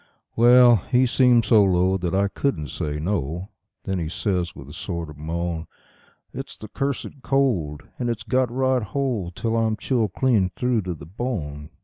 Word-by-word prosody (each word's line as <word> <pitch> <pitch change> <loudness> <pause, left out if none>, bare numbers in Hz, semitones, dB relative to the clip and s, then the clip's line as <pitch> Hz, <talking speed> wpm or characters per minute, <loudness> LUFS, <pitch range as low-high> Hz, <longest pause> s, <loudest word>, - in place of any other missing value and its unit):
Well, 120 0 +7
he 125 +7 +2
seemed 125 -2 +4
so 110 -4 +6
low 95 0 +3
that 90 -1 -1
I 100 +1 +3
couldn't 90 - -2
say 75 +2 -3
no; 85 +1 -2 0.3
then 95 -1 -2
he 80 -2 -3
says 90 -1 -2
with - - -11
a - - -10
sort 85 -2 -5
of - - -12
moan: 85 +1 -3 0.7
"It's - - -7
the 110 - -10
cursed 140 +1 -3
cold, 105 - 0 0.2
and 120 - -1
it's 115 -2 -3
got 130 -1 +1
right 130 0 +1
hold 110 -7 -2
till 115 +3 -1
I'm 110 -1 +1
chilled 115 -7 0
clean 115 -9 +2
through 125 -3 +1
to 90 - -2
the 70 - -11
bone. 80 - -4
105 Hz, 175 wpm, -23 LUFS, 85-125 Hz, 0.7 s, Well